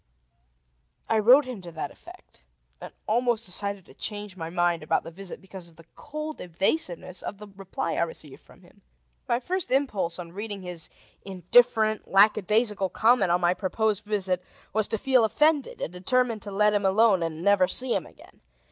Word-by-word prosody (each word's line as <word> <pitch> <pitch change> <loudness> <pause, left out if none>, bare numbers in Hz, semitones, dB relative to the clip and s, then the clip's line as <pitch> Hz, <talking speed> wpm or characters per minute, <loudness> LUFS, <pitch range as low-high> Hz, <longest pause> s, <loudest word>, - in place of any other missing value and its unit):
I 225 - +2
wrote 250 +7 +6
him 250 -6 -7
to 175 -1 -10
that 160 - -5
effect, - - -16 0.4
and - - -8
almost 235 0 +1
decided 200 0 -2
to - - -16
change 205 -2 -6
my 165 -3 -6
mind 175 -1 +1
about 155 - 0
the - - -9
visit 190 +2 -8
because 190 -2 -10
of 165 - -20
the 165 0 -17
cold 305 +1 -7
evasiveness 180 - -1
of 205 - -6
the 210 +1 -11
reply 190 -3 -4
I - - -1
received 160 -4 -5
from - - -20
him. - - -22 0.5
My 235 - +2
first 365 +7 -3
impulse 235 -11 0
on 170 -2 -8
reading 205 +1 -6
his 175 -2 -4 0.3
indifferent, 215 +4 +2
lackadaisical 210 0 +3
comment 220 0 +3
on 175 +1 +2
my 175 0 +3
proposed 210 +2 -1
visit 190 -4 0 0.3
was 215 0 +1
to 220 - -2
feel 260 +1 +3
offended, 300 +5 +1
and 165 - -4
determine 230 +5 0
to 205 0 -4
let 210 +2 +3
him 205 -1 +1
alone 195 0 +4
and 165 0 -4
never 200 -2 +4
see 255 +4 0
him - - -2
again. - - -19
200 Hz, 180 wpm, -26 LUFS, 180-225 Hz, 0.5 s, wrote